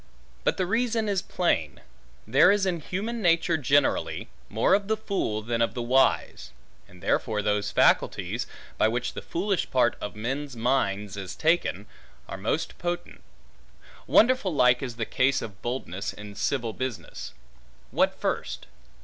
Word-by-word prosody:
But - - +1
the 185 - +1
reason 225 +2 0
is 195 -3 +1
plain. 80 - -1 0.5
There 135 - +6
is 205 -1 +2
in 180 -3 0
human 215 +9 -4
nature 170 -2 +3
generally, 145 -1 +1 0.2
more 110 - +2
of 200 0 +2
the 220 0 +1
fool 190 - -2
than 115 +1 -1
of 115 - +1
the 120 - -2
wise; 130 +3 +2 0.4
and 90 -1 -17
therefore 105 -3 0
those 105 0 0
faculties, 100 - +2 0.3
by - - +5
which 120 +2 -2
the - - -6
foolish 195 +2 -1
part 125 -2 +3
of 105 - -5
men's 135 +5 -3
minds 105 -5 0
is 95 -2 -6
taken, 160 - +1 0.4
are - - -6
most 110 +10 -2
potent. 175 0 -4 0.9
Wonderful 230 -7 +4
like 125 -2 +4
is 125 -4 -4
the 115 -1 -2
case 135 +4 +2
of 100 -4 -8
boldness 110 -6 -4
in 105 -1 -9
civil 115 +2 -1
business: 130 -2 -6 0.6
what - - +1
first? - - -2
130 Hz, 150 wpm, -26 LUFS, 105-175 Hz, 0.9 s, There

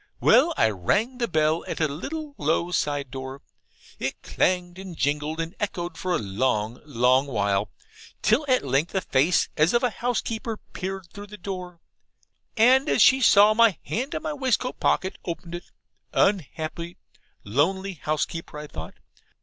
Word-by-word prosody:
Well - - +5
I 110 - +4
rang 210 - 0
the 235 - +1
bell 155 -1 +1
at - - -4
a 155 - +2
little 290 - -6
low 175 +1 0
side 145 -6 -1
door; 130 +1 -7 0.6
it - - -4
clanged 180 0 0
and 190 -4 -8
jingled 150 +3 -1
and 165 +1 -3
echoed 175 -4 -3
for 180 0 -1
a - - +2
long, 110 +2 -1
long 130 0 +3
while, 100 -5 0 0.5
till - - +3
at 255 - +2
length 140 +8 0
a 190 - +2
face, 155 +4 +2
as 160 +9 +3
of 240 - +2
a 250 - +2
housekeeper, 225 0 -2 0.2
peered 190 0 -5
through 205 0 -9
the 210 +1 -10
door, 180 -2 -7 0.8
and, 260 +6 +5
as - - +5
she 265 0 +6
saw 210 -2 +7
my 225 -4 +4
hand 260 +6 -3
in - - -4
my 315 -1 -2
waistcoat 260 -3 -1
pocket, 190 - 0
opened 170 0 -6
it. 175 0 -6 0.5
Unhappy, 170 -2 -1 0.5
lonely 190 - 0
housekeeper, 155 +1 -3
I 150 - -6
thought. 80 - -8
175 Hz, 160 wpm, -25 LUFS, 145-210 Hz, 0.8 s, saw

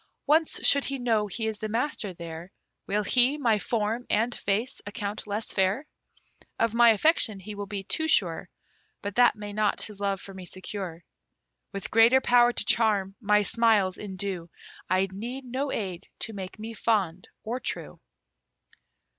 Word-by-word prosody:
Once 315 +2 +2
should 280 0 +5
he 275 - -2
know 225 -4 +1
he 220 +3 -4
is 220 -1 -3
the 215 - -4
master 230 -2 -1
there, 170 0 -8 0.4
Will 210 +1 0
he 250 +6 +4
my 230 -7 +2
form 225 +2 -1
and 230 +3 +1
face 220 +7 -2
account 205 -1 -4
less 210 +2 -3
fair? 195 +9 +1 0.7
Of 230 -1 +1
my 235 0 +6
affection 225 -3 +3
he 210 +3 -8
will 205 0 -6
be 200 -1 -5
too 315 +11 0
sure, 180 - +1 0.5
But 205 0 -3
that 245 +2 +5
may 205 -1 -7
not 210 0 +1
his 210 -2 -7
love 200 -1 -1
for 195 - -9
me 190 -1 -9
secure. 185 -3 -6 0.7
With 195 -1 -6
greater 230 +4 +6
power 245 -1 +5
to - - -4
charm, 205 -4 +2
my 210 -1 +3
smiles 215 -4 +3
endue, 190 -3 -4 0.4
I 185 +1 +2
need 240 +7 -6
no 265 +3 -2
aid 190 -4 -4
to 225 - -3
make 190 -2 -7
me 220 +2 -7
fond 195 -6 0 0.2
or 240 +4 -3
true. - - -6
210 Hz, 165 wpm, -27 LUFS, 195-235 Hz, 0.7 s, my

